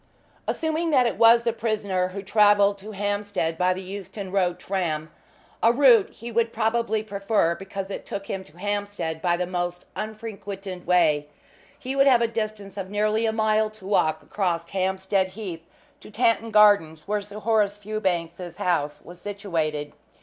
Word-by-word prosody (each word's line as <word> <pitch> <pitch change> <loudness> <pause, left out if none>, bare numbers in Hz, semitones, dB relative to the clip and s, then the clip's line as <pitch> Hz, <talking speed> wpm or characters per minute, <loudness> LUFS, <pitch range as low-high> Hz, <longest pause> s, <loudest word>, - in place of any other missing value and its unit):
Assuming 320 +1 -1
that 260 -5 +4
it 225 -3 -1
was 230 +1 +7
the 235 -1 +1
prisoner 210 -5 -1
who 195 +2 -7
travelled 205 -1 +4
to 205 +3 -9
Hampstead 205 -4 -1
by 180 +2 +2
the 185 +1 -3
Euston 190 0 -7
Road 180 -3 +1
tram 165 -5 -2 0.5
a 230 - +6
route 240 -5 +5
he 235 +2 -9
would 230 0 +1
probably 225 -1 0
prefer 200 -4 +1
because 195 +2 -6
it - - -5
took 195 - -5
him 190 -1 -4
to 150 - -19
Hampstead 205 -5 -3
by 175 -1 +2
the 180 - -1
most 175 0 -3
unfrequented 205 -4 -6
way 155 -5 +3 0.5
he 270 -1 -5
would 275 0 +5
have 245 -3 +5
a - - +3
distance 215 -3 -4
of 190 -1 -4
nearly 215 +2 +1
a - - +2
mile 220 0 +2
to 215 -3 -14
walk 160 -6 +1
across 170 -4 -1
Hampstead 190 0 0
Heath 185 -4 -7 0.3
to - - -13
Tanton 230 +1 +1
Gardens, 205 -8 +4
where 210 0 0
Sir 205 +1 -10
Horace 210 -2 +1
Fewbanks's 180 -5 -3
house 150 -5 -1
was 175 0 -13
situated. 165 -8 -3
200 Hz, 165 wpm, -25 LUFS, 180-215 Hz, 0.5 s, was